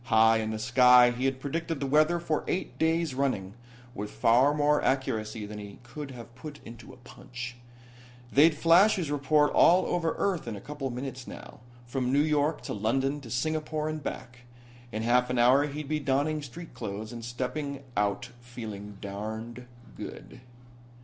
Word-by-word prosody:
High 110 -1 +5
in 110 -1 -2
the 110 - -3
sky 125 +1 +6
he 125 +2 -3
had 135 -1 0
predicted 160 +2 -3
the 140 - -2
weather 155 +5 +3
for 160 -3 -1
eight 185 - -3
days 160 -2 +1
running, 130 -8 -1 0.4
with 105 -1 -5
far 125 +7 +4
more 150 0 +2
accuracy 110 -5 -1
than 105 0 -8
he 100 -1 -9
could 140 +4 -8
have 120 -2 -10
put 145 +3 -9
into 115 +2 -11
a 130 - -14
punch. 125 0 -9 0.8
They'd 150 +2 +5
flash 175 +7 +5
his 170 -7 -3
report 145 +1 +3
all 180 +2 +5
over 165 -2 0
Earth 185 -9 -1
in 115 - -4
a - - -7
couple 145 +3 -5
of 125 - -5
minutes 130 0 -6
now. - - -10 0.3
From 125 0 -2
New 140 - +2
York 150 0 +1
to - - -4
London 135 +7 0
to 120 - -11
Singapore 155 +4 -1
and 155 0 -3
back. 125 -2 -6 0.5
In 110 0 -3
half 125 +2 +3
an 125 - -1
hour 130 +5 +5
he'd 145 0 -6
be 155 +1 -1
donning 145 +2 0
street 155 +4 -10
clothes 110 -1 -6
and 115 -1 -7
stepping 135 +4 -4
out 105 +5 -1
feeling 110 -4 -8
darned 110 +4 -6 0.3
good. - - -9
130 Hz, 175 wpm, -28 LUFS, 115-150 Hz, 0.8 s, sky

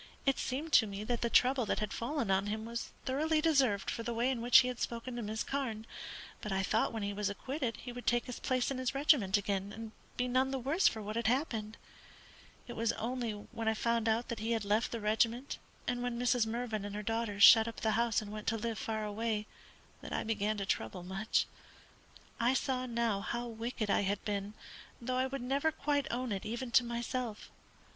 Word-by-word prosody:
It 275 -1 +2
seemed 295 +5 -3
to 220 - +7
me 200 +1 -5
that 235 +2 -1
the 235 - +1
trouble 255 +2 +4
that - - +1
had 210 -1 -2
fallen 240 -3 -1
on 190 +1 +2
him 215 +1 -3
was 235 0 -4 0.2
thoroughly 310 +4 +1
deserved 270 -11 +2
for - - -3
the 235 +1 -3
way 240 +3 +2
in 245 -3 -2
which 240 +2 +8
he 250 - -1
had 250 -1 -4
spoken 235 +1 -3
to 240 - -3
Miss 220 +1 -2
Carne; 240 -6 -3 0.6
but 210 - -4
I 190 0 +1
thought 215 +3 +1
when 225 -2 -3
he 200 0 -2
was 205 0 -1
acquitted 255 +3 -3
he 245 - -7
would 245 0 -9
take 240 0 +3
his 250 - -6
place 255 0 0
in 265 - -2
his 255 +1 -1
regiment 265 -9 +4
again, 200 -1 -2
and 220 +1 -7 0.3
be 250 - +1
none 255 +2 +2
the 270 - -1
worse 280 +9 +3
for 220 -1 -1
what 215 +2 -4
had 235 -1 0
happened. 230 -4 0 0.9
It 240 - -6
was 230 0 0
only 240 -1 -2
when 225 +2 -6
I 220 - +3
found 235 0 +1
that 230 0 0
he 225 +2 0
had 225 -3 -1
left 210 +3 +1
the 230 - -3
regiment, 225 +5 +1 0.3
and 245 0 0
when 245 -1 -2
Mrs. 245 -1 +2
Mervyn 225 -2 -2
and 205 0 -5
her 210 - -4
daughters 225 -2 0
shut 225 +1 +10
up 230 - -6
the 220 - +2
house 230 -1 +2
and 205 - -8
went 215 0 -7
to 225 - +2
live 225 0 -3
far 220 -1 -2
away, 215 0 -1 0.6
that - - -7
I - - 0
began 215 -1 0
to 200 - -2
trouble 175 - -2
much. 195 +4 0 0.9
I 245 +3 +3
saw 260 -2 0
now 230 -4 0
how 240 +3 -3
wicked 225 -2 -3
I - - +3
had 200 0 -1
been, 205 0 -2 0.4
though 255 +1 -2
I 260 +1 +2
would 270 -1 -5
never 280 +5 +1
quite 290 -2 0
own 245 0 -2
it 195 -2 -2
even 240 +3 -4
to 250 - +6
myself. 235 -1 -4
230 Hz, 225 wpm, -33 LUFS, 215-250 Hz, 0.9 s, shut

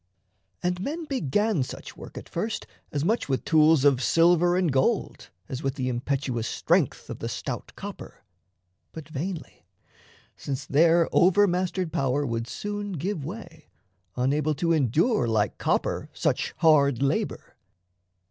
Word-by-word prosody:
And 180 0 0
men 315 - -3
began 210 - 0
such 130 - -6
work - - -11
At - - -8
first - - -3 0.3
as 145 +1 -1
much 220 -4 0
with 130 - -1
tools 155 -2 +5
of 135 -3 +4
silver 175 +4 +4
and 180 -4 +2
gold 195 - 0 0.2
As 130 -2 -5
with 135 -2 -2
the 130 -3 -2
impetuous 125 -1 -2
strength - - 0
of - - -7
the - - -4
stout - - -5
copper; - - -9 0.7
But 160 -3 -8
vainly 160 +3 -6 0.7
since 140 0 -5
their 165 +3 +4
over 190 +3 +5
mastered 180 -2 -1
power 135 +2 0
Would 115 -2 -2
soon 205 +7 -4
give 170 0 -3
way, 170 -2 -9 0.5
unable 145 +4 +1
to 165 +3 +1
endure, 155 - +2
Like 110 -3 0
copper, - - -1
such - - 0
hard 140 -6 +4
labour. 140 - -2
155 Hz, 140 wpm, -26 LUFS, 135-180 Hz, 0.7 s, tools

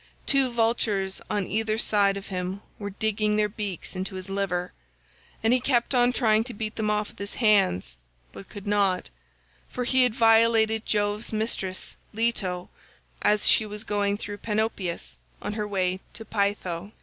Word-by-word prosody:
Two 275 -2 +4
vultures 225 -4 0
on 205 -2 0
either 215 +2 0
side 200 -3 +2
of 200 - -8
him 185 +1 -3 0.2
were 205 -1 -4
digging 210 +1 0
their 210 0 +3
beaks 205 -4 -5
into 190 +1 -3
his 185 +1 -7
liver, 185 -2 -1 0.7
and 225 +2 +4
he 255 - +4
kept 245 0 +1
on 245 -1 +4
trying 220 -3 +3
to 245 - -7
beat 215 0 -4
them 215 -1 -1
off 210 0 0
with - - -17
his 200 0 -5
hands, 190 - +2 0.4
but 195 - -11
could 205 -1 -9
not; 200 - +1 0.6
for 250 - -3
he 260 +1 +3
had 250 -3 +3
violated 225 -2 +4
Jove's 205 +1 0
mistress 215 -4 -2 0.2
Leto 195 -6 -1 0.5
as 210 0 +3
she - - +6
was 210 +1 -6
going 205 -1 0
through 205 -1 -6
Panopeus 190 - -2 0.2
on - - -4
her 210 -1 -2
way 185 -2 0
to 225 - -7
Pytho. 200 -2 -2
210 Hz, 165 wpm, -26 LUFS, 195-225 Hz, 0.7 s, she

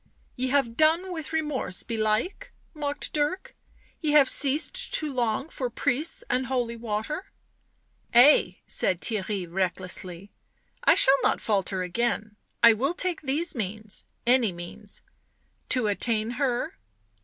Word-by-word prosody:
" - - -37
Ye 255 +1 -1
have 260 -4 +1
done 330 +5 +3
with 320 -3 -6
remorse 300 - -1
belike?" 230 - -1 0.2
mocked 290 -2 -3
Dirk. 300 +5 -1 0.2
" - - -33
Ye 300 -2 0
have 290 -3 +7
ceased 300 - +1
to 305 -3 0
long 240 +2 0
for 255 -6 -4
priests 255 +6 -1
and 255 0 0
holy 245 -2 -1
water?" 230 - -4 0.4
" - - -42
Ay," 240 -8 +6
said 180 - 0
Theirry 205 -3 -2
recklessly, 185 +1 -3 0.3
" - - -36
I - - +6
shall 270 +1 +5
not - - +2
falter 195 -3 0
again 215 +2 -2
— - - -45
I 230 -1 +9
will 270 +10 -1
take 365 -2 -2
these 305 +4 0
means 215 -2 -5
— - - -45
any 235 -6 +1
means 175 0 -8 0.2
" - - -44
" - - -43
To 250 -3 +2
attain 215 +2 0
— - - -8
her?" 250 -3 -1
245 Hz, 160 wpm, -26 LUFS, 215-295 Hz, 0.4 s, I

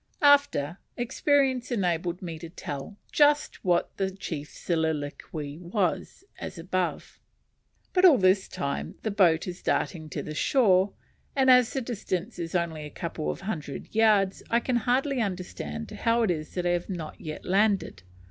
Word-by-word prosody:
After 280 - +4 0.2
experience 260 0 +1
enabled 175 -4 -1
me 165 -3 -5
to 165 - -8
tell 160 +3 -7
just 295 0 +3
what 175 -2 +1
the 190 -1 0
chief's 165 -6 -6
soliloquy 155 -2 -3
was, 180 - -2 0.2
as - - -6
above. 180 +1 -3 0.7
But 365 - +3
all 340 -8 +8
this 190 -1 +3
time 140 0 -4
the 220 - -1
boat 175 -5 +3
is 180 0 -6
darting 155 -4 -1
to - - -4
the 155 - -6
shore; 195 - +3 0.4
and 265 -2 +5
as 250 -2 +6
the 270 - -1
distance 215 -4 -4
is 170 +1 -4
only 165 -3 -1
a 150 - -7
couple 160 0 -4
of - - -4
hundred 160 -8 -5
yards, 210 -3 +3
I 235 - +3
can 245 +1 0
hardly 255 +2 +1
understand 180 - -4
how 230 0 +1
it 210 - +2
is 155 -2 -4
that 180 -1 -1
I 175 - +3
have 175 +2 -1
not 170 -5 -6
yet 155 -1 -7
landed. 195 - +1
185 Hz, 160 wpm, -27 LUFS, 165-230 Hz, 0.7 s, all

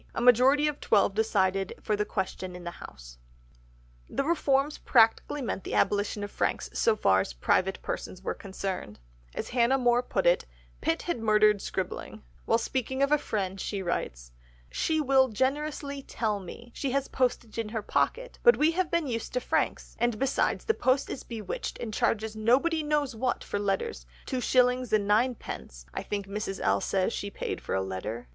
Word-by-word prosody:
A - - -1
majority 255 +5 +5
of 300 -1 -2
twelve 205 -2 +3
decided 195 -3 +1
for 215 - 0
the 210 0 0
Question 185 -2 -4
in 180 - -9
the 175 0 -7
House. - - -12 0.9
The - - -1
reforms 290 -2 +1
practically 235 +4 +3
meant 210 -5 -3
the - - -4
abolition 205 +1 +1
of 205 - -5
franks - - -1
so 225 - +3
far 95 - +3
as 65 - -5
private 185 - +1
persons 185 0 -5
were - - -1
concerned, 190 - -5 0.4
as - - -4
Hannah 245 +2 +3
More 245 -1 +3
put 200 -6 -2
it, 175 +1 +3 0.3
Pitt 165 - 0
had 345 -8 -2
murdered 215 -2 +4
scribbling; 185 -1 -5 0.2
while 230 - +3
speaking 260 +3 -1
of 280 - +2
a 300 - +5
friend 195 -5 -3
she 200 -2 -3
writes: - - -3 0.4
"She 315 -1 0
will 265 -2 +4
generously 280 +4 -2
tell 215 -5 -2
me 235 +6 -10
she 275 - -2
has 275 0 0
postage 245 -3 -1
in 225 -2 -2
her 220 -1 -3
pocket, - - -1
but 480 0 +6
we 310 +2 +4
have 355 0 0
been 340 -2 +1
used 230 -4 -4
to 250 - +1
franks, - - -1
and 240 -1 +1
besides 270 +3 0
the 445 - +3
post 265 -6 +1
is - - -5
bewitched 220 -5 -5
and 220 -3 -5
charges 220 0 0
nobody 265 +10 +2
knows 295 -4 0
what 245 +2 -1
for 205 - -3
letters; 195 - -2 0.2
two 255 - -2
shillings 250 -1 +3
and 210 -2 +2
ninepence, 210 - -1
I - - -3
think 200 -1 -3
Mrs. 200 -1 -4
L. 100 +1 +2
says 190 +3 0
she 200 - -3
paid - - -4
for - - -3
a 95 - +1
letter." 105 +5 -5
225 Hz, 185 wpm, -28 LUFS, 195-265 Hz, 0.9 s, but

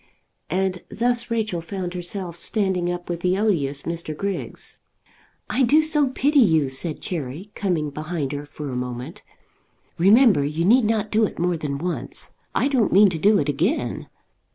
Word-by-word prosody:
And 185 +1 -1
thus 240 +2 0
Rachel 220 -7 -1
found 180 +1 -5
herself 175 0 -5
standing 190 -4 0
up 175 0 -5
with 175 -1 -3
the 180 +2 +1
odious 145 -10 0
Mr. 165 -2 -5
Griggs. 200 +1 -4 0.7
"I 265 - 0
do 290 +5 +5
so 300 -2 +3
pity 280 +3 +2
you," 160 - +4
said 150 +4 -2
Cherry, 165 +4 -5
coming 165 -7 -1
behind 155 -1 -3
her 145 0 -5
for 145 -1 -7
a - - -4
moment. 125 +4 -5 0.8
"Remember, 205 - +6
you 155 +4 -1
need 235 +4 +5
not 215 -1 0
do 220 +1 +3
it - - -6
more 175 +1 +1
than 150 -3 -3
once. 175 +4 -4 0.2
I - - +2
don't 260 -6 +2
mean 200 +2 +7
to 165 - -3
do 205 +5 +5
it - - 0
again." 165 - -1
180 Hz, 170 wpm, -23 LUFS, 155-215 Hz, 0.8 s, mean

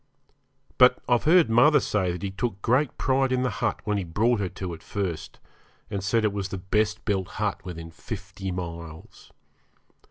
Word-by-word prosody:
But 125 0 +7
I've 120 -1 +2
heard 170 +1 +6
mother 120 +7 +5
say 95 -4 0
that 90 +2 -6
he 100 - -2
took 100 0 -3
great 130 +4 +2
pride 135 -1 +1
in 130 0 +1
the 125 - 0
hut 115 -3 0
when 105 -1 0
he - - -2
brought 110 +7 +1
her 95 -3 -1
to 90 -2 -6
it 80 - -9
first, 90 -6 -4 0.5
and 100 -2 -3
said 110 +3 +2
it 105 - +1
was 100 -1 -3
the 100 - -4
best 105 +3 0
built 95 -4 0
hut 105 -3 -3
within 85 -2 -7
fifty 95 +1 -7
miles. 85 -3 -8
100 Hz, 185 wpm, -26 LUFS, 90-120 Hz, 0.5 s, But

